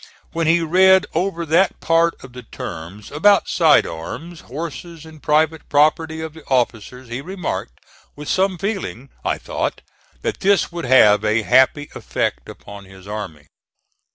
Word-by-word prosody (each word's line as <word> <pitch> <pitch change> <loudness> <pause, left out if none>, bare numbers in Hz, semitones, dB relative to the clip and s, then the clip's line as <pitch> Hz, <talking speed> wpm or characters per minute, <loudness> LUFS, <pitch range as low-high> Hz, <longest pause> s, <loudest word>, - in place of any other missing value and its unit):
When 165 -1 -1
he 170 +1 +4
read 190 +3 +5
over 170 0 -1
that 170 +5 +2
part 165 +1 +2
of 135 -2 -12
the 125 - -9
terms 95 -3 -9
about 200 +7 +3
side 160 -4 +4
arms, 155 - -7
horses 165 +3 -8
and 160 -2 -14
private 155 +1 +1
property 160 +2 +2
of 160 -1 -6
the 160 -1 -14
officers, 125 0 -2
he 120 +3 -5
remarked, 180 - -5 0.4
with 150 0 -9
some 190 -1 +1
feeling, 185 - -4
I - - -1
thought, - - -4 0.4
that - - -2
this 195 -2 +2
would 170 -3 -5
have 110 -5 +5
a 110 +1 +1
happy 130 +8 +3
effect - - -3
upon 100 -1 -11
his 95 0 -15
army. 95 -8 -7
155 Hz, 155 wpm, -20 LUFS, 115-170 Hz, 0.4 s, read